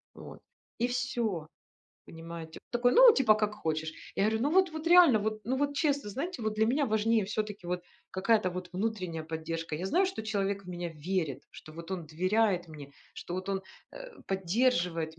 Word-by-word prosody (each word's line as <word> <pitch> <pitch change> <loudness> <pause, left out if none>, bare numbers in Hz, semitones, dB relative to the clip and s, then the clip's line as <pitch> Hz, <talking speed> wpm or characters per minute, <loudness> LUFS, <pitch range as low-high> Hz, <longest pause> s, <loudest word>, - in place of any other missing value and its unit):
Вот. - - -11 0.4
И 240 - +2
всё. 235 - -2 0.6
Понимаете? 165 0 -9
Такой, 245 +1 +2
ну, - - +9
типа: 230 -6 +5
"Как 210 -1 0
хочешь". 160 -4 -3 0.2
Я 195 - +2
говорю: 220 +1 0
"Ну, 285 - +1
вот, 370 -1 +4
вот 315 +1 -6
реально, 345 -9 +7
вот, 215 +1 -2
ну, 255 +5 -1
вот 285 0 0
честно". 285 -6 0
Знаете, 335 - -4
вот 215 0 -1
для 215 +1 +2
меня 275 +4 +1
важнее 220 -1 +2
всё-таки 210 -2 -4
вот 180 0 -2 0.3
какая-то 195 0 +2
вот 180 0 -6
внутренняя 185 -5 -3
поддержка. 165 0 -4
Я 180 +4 -3
знаю, 370 - +3
что 375 -11 -4
человек 200 -2 -2
в - - -13
меня 175 -1 -4
верит, 165 -8 -1
что 155 - -12
вот 170 +2 -10
он 175 -4 -4
доверяет 185 +2 +1
мне, 145 -3 -11 0.2
что 175 - -6
вот 185 +1 -5
он, 195 -1 -1 0.3
э, - - -9 0.2
поддерживает 180 -5 0
200 Hz, 185 wpm, -30 LUFS, 170-240 Hz, 0.6 s, ну